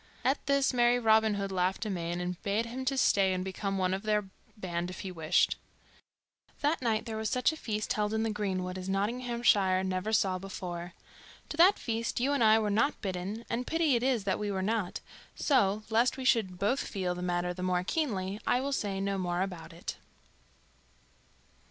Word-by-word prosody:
At 270 +2 +1
this 280 -1 +3
merry 240 0 +4
Robin 220 -2 +4
Hood 200 -1 -3
laughed 185 +3 0
amain, 175 -4 -2
and 180 0 -4
bade 210 +2 0
him 255 +3 -6
stay 200 -8 +3
and 185 0 -2
become 195 +1 -3
one 185 -1 +1
of 190 - -2
their 210 -1 +1 0.3
band 175 -3 -3
if 185 - -7
he 190 - -5
wished. 165 0 +2 1.0
That 295 +1 +1
night 225 -3 0
there 220 -1 -4
was 220 -1 -1
such 250 +5 +2
a - - -6
feast 215 -8 -2
held 210 0 0
in 220 0 0
the 225 - 0
greenwood 185 -3 -2
as 185 +1 -6
Nottinghamshire 205 -2 +2
never 190 +3 -2
saw 190 -4 +2
before. 175 -2 -6 0.6
To 305 - -5
that 365 +5 +6
feast 230 0 -2
you 265 +4 +1
and 280 - +2
I 220 0 +6
were 215 -2 0
not 230 +8 +1
bidden, 195 +4 -4
and 245 +2 -3
pity 325 -5 +2
it 235 - +1
is 250 -4 +1
that 195 -1 0
we 210 -1 -2
were 190 -1 -1
not; 210 -2 -1 0.3
so, 215 -7 +2
lest 235 +4 +3
we 260 - -5
should 215 -8 +2
both 220 +9 +1
feel 185 -3 -2
the 180 - -6
matter 180 0 -1
the 180 - -8
more 180 -1 +1
keenly, 200 - -2
I 245 - +3
will 275 +2 -2
say 200 -6 -1
no 195 0 -1
more 175 0 0
about 180 -4 -6
it. 170 +1 -6
205 Hz, 195 wpm, -30 LUFS, 185-235 Hz, 1.0 s, that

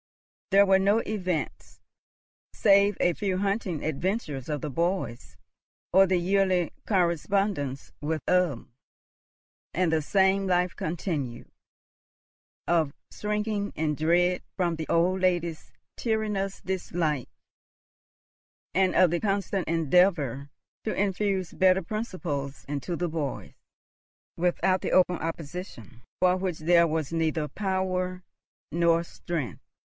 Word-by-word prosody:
There 200 +1 +6
were 190 -1 +5
no 200 +3 +3
events, 185 -6 -3 0.8
save 200 -1 +4
a 175 - +3
few 195 -1 -1
hunting 195 -4 -1
adventures 155 - -2
of 150 -2 -2
the 150 - -3
boys, 170 -6 -2 0.6
or 190 +1 +7
the 185 0 +2
yearly 185 -1 +2 0.2
correspondence 175 -5 0
with 155 0 -2
Ulm; 175 -10 +1 1.0
and 175 -1 +2
the 160 - +2
same 190 +4 +2
life 180 -1 +1
continued, 155 -7 -4 1.2
of 160 -4 +2 0.2
shrinking 210 -1 -2
in 155 -1 0
dread 175 +4 +2 0.2
from 175 -3 +1
the 160 -1 -5
old 180 +3 +2
lady's 175 -3 0 0.3
tyrannous 210 -4 -1
dislike, 170 -7 -2 1.4
and 185 +2 +2
of 185 -3 +5
the 175 - +1
constant 195 -2 -1
endeavour 160 -4 +2 0.3
to 220 - -2
infuse 195 -2 0
better 190 0 +3
principles 175 - -4
into 145 +4 -3
the 175 +1 -1
boys, 155 -4 -4 0.8
without 180 +2 +1
the - - -2
open 180 -1 +4
opposition 160 - -7 0.2
for 185 0 +4
which 185 -3 -2
there 170 +1 +4
was 160 -1 -2
neither 160 -2 0
power 185 +1 -2 0.5
nor 170 +1 +3
strength. 165 - -5
180 Hz, 115 wpm, -27 LUFS, 160-190 Hz, 1.4 s, or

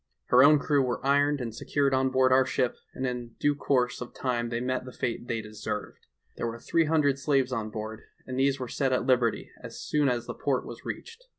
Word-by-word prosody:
Her 125 +1 +7
own 150 +2 +7
crew 145 0 +2
were 125 0 -2
ironed 145 0 +3
and 115 -2 -4
secured 140 +4 0
on 130 0 +2
board 130 0 +3
our 130 +1 +6
ship, 130 -1 0 0.2
and 130 - -2
in 120 -2 -4
due 145 - +3
course 125 -4 0
of 125 - -7
time 120 -2 -1
they 115 0 -2
met 130 +1 -1
the 130 - -9
fate 120 -1 -3
they 115 -1 -1
deserved. 105 0 -6 0.3
There - - -2
were 115 0 -5
three 165 +7 +1
hundred 150 -3 +2
slaves 135 -2 +1
on 110 -3 -2
board, 110 +1 -6 0.2
and 130 0 -4
these 135 0 +2
were 125 - -4
set 130 +2 0
at 125 - 0
liberty 125 -3 +1
as - - -9
soon 150 -2 +1
as 120 -1 -1
the - - -5
port - - -1
was - - -9
reached. 470 +1 -7
130 Hz, 225 wpm, -28 LUFS, 120-140 Hz, 0.3 s, Her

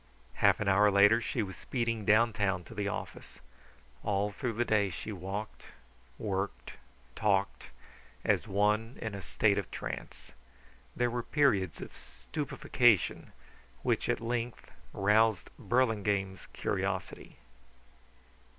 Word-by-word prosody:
Half - - +5
an 105 - -2
hour 100 +2 +5
later 100 +3 +5
she 115 0 -1
was 95 -2 -7
speeding 115 -4 -2
downtown 105 -4 +3
to 115 - -12
the 105 -2 -2
office. 100 - -6 0.6
All 105 0 0
through 115 +3 -3
the 120 +2 0
day 105 -3 +2
she 95 - -6
walked, 100 +2 -6 0.5
worked, 100 -2 -3 0.4
talked 100 -2 0 0.6
as - - +2
one 105 +4 +1
in 110 - -4
the 100 0 -6
state 100 +1 +2
of 95 - -6
trance. - - -7 0.6
There 120 -1 +1
were 120 0 -1
periods 110 - +1
of - - -9
stupefaction 75 - 0 0.5
which - - 0
at - - +1
length 120 0 -4 0.2
roused 105 +1 +2
Burlingame's 105 -6 0
curiosity. - - -3
105 Hz, 120 wpm, -31 LUFS, 100-115 Hz, 0.6 s, Half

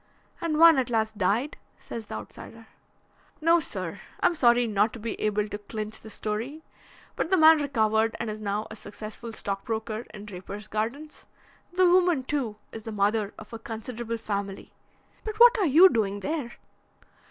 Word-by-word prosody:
"And 325 -2 -1
one 325 -3 +8
at 250 - -1
last 220 -2 0
died," 225 +10 +1 0.2
says 225 -2 -8
the - - -6
outsider. 225 - -10 0.7
"No, 330 +2 +4
sir. - - -5 0.2
I'm - - +3
sorry 245 -5 +4
not 210 0 +1
to 245 - -8
be 225 0 -3
able 210 0 0
to 205 0 -6
clinch 215 +1 -5
the 220 - -12
story, 225 +9 -4 0.5
but - - -2
the 375 - +4
man 315 -1 +7
recovered 220 -5 +1
and 230 - -3
is 215 0 -4
now 210 0 -2
a - - -7
successful 215 +2 -9
stockbroker 220 +2 -4
in 210 0 -10
Drapers 205 +1 -8
Gardens. 235 +9 -4 0.5
The 370 0 +4
woman, 350 -5 +4
too, 255 -6 -2 0.2
is 220 -1 -9
the 225 - -5
mother 205 0 0
of 220 - -12
a 230 - -6
considerable 230 +1 -5
family. 200 -3 -4 0.5
But 430 0 -5
what 485 +1 +9
are 385 - +3
you 325 +7 +8
doing 205 - 0
there?" 290 -4 -3
225 Hz, 170 wpm, -27 LUFS, 210-290 Hz, 0.7 s, what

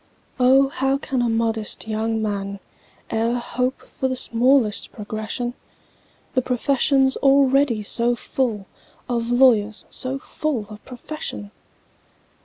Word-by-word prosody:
"O, 265 +2 +5
how 270 0 0
can 265 -2 -2
a 240 - +1
modest 225 -1 -1
young 220 0 -1
man 200 -1 -3 0.5
E'er 230 +2 +1
hope 250 +2 -2
for 265 - -3
the 260 - -2
smallest 250 -2 +2
progression,— 220 +3 -4 0.8
The 255 - +2
profession's 265 +2 +2
already 275 -4 +3
so 235 +3 +1
full 230 -4 -2 0.4
Of 235 -1 -1
lawyers 235 -4 +3
so 260 +1 -2
full 275 -4 -3
of 210 - -11
profession!" 245 - -7
245 Hz, 115 wpm, -22 LUFS, 220-265 Hz, 0.8 s, O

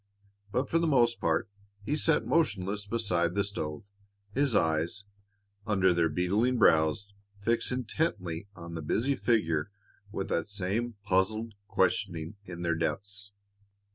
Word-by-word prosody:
But 130 +5 0
for 165 - +2
the 165 - +1
most 120 -6 +3
part 80 0 +1 0.4
he 145 - 0
sat 160 0 +2
motionless 105 - 0
beside 90 -6 +1
the 100 - +3
stove, 80 -7 -4 0.5
his 135 -2 +2
eyes, 80 +4 +1 0.6
under 95 -3 +4
their 85 -1 +2
beetling 100 +10 +1
brows, 90 +1 +3 0.3
fixed 115 +4 +1
intently 105 - -2
on 85 0 -8
the 80 - -4
busy 115 - +1
figure 85 -12 +1 0.4
with 95 -2 -3
that 85 +4 -1
same 105 +4 -1
puzzled 105 +3 +1
questioning 95 -2 0
in 85 -1 -7
their 85 0 +2
depths. 100 +6 -3
100 Hz, 135 wpm, -30 LUFS, 85-115 Hz, 0.6 s, under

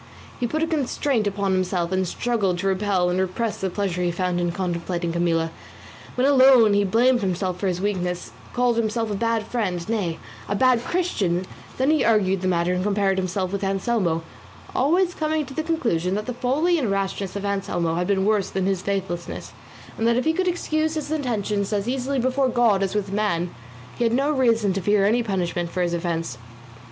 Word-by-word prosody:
He 245 - 0
put 310 +6 -1
a - - +1
constraint 275 -6 0
upon 200 -1 -1
himself, 180 -2 0
and 185 -1 0
struggled 205 -4 0
to 195 +2 -2
repel 190 -2 +1
and 180 - 0
repress 195 +4 -1
the 190 - 0
pleasure 185 -2 -2
he 175 - +1
found 175 0 -1
in 175 0 0
contemplating 175 -1 -2
Camilla; 165 -1 0 0.6
when 250 - +2
alone 260 -6 +6
he 205 0 +3
blamed 240 +5 +3
himself 185 -1 -1
for 195 - -1
his 180 -1 -1
weakness, 180 - -2 0.2
called 245 -1 +1
himself 225 0 0
a - - -1
bad 230 +1 0
friend, 185 -8 -2
nay 200 -7 -1 0.3
a 205 - 0
bad 250 +1 +3
Christian; 195 - 0 0.3
then 265 +3 +2
he 310 -4 +3
argued 195 -4 +2
the 185 - -1
matter 175 0 +1
and 180 0 -1
compared 200 -1 +1
himself 185 0 -2
with 200 0 -3
Anselmo; 195 -4 0 0.5
always 350 +7 +2
coming 310 -2 -1
to 270 - -10
the 315 - -1
conclusion 230 - 0
that 210 +1 -3
the 250 - -3
folly 290 +8 +1
and 245 -7 -1
rashness 195 -1 -2
of 200 0 -3
Anselmo 180 -4 -1
had 175 +2 -1
been 195 -1 +1
worse 210 -2 +2
than 190 -1 -1
his 195 -2 0
faithlessness, 190 -3 -4 0.5
and 225 - +2
that 235 0 +3
if 255 - 0
he 320 - +3
could 370 +2 0
excuse 315 -3 0
his 305 -1 -4
intentions 215 -9 -1
as 205 0 -1
easily 265 +2 -1
before 260 +1 +1
God 235 -5 +3
as 195 +1 -1
with 200 -2 -1
man, 180 -5 0 0.5
he - - +2
had 230 - +2
no 275 +4 +2
reason 230 -8 +2
to 195 - -2
fear 205 +1 +3
any 230 +4 +3
punishment 180 -5 -2
for 180 +1 -1
his 175 -1 -1
offence. 165 -7 -2
200 Hz, 200 wpm, -23 LUFS, 180-245 Hz, 0.6 s, alone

